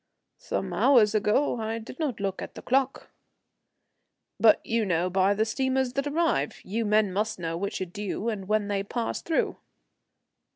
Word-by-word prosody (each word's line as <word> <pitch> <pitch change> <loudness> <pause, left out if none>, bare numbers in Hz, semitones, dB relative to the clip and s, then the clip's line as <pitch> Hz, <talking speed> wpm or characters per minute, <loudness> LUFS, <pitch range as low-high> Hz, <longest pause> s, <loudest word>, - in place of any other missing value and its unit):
"Some - - -3
hours 230 -6 +5
ago. 220 +5 +2
I 220 +1 -2
did 230 +5 -10
not 285 -9 -2
look 195 -1 -2
at - - -8
the - - -9
clock." 270 +1 0 1.3
"But 220 -2 +6
you 230 0 +1
know 180 -2 0
by 190 +2 +3
the 215 +2 +1
steamers 260 +2 0
that 275 +2 -1
arrive. 290 - 0
You 225 +4 -2
men 210 -2 +2
must 215 +3 -1
know 165 -2 -3
which 200 +4 -3
are - - 0
due, 205 +4 -4
and 205 -5 -3
when 215 -1 +1
they 200 -1 0
pass 230 +4 -3
through." 325 - 0
215 Hz, 170 wpm, -27 LUFS, 200-245 Hz, 1.3 s, But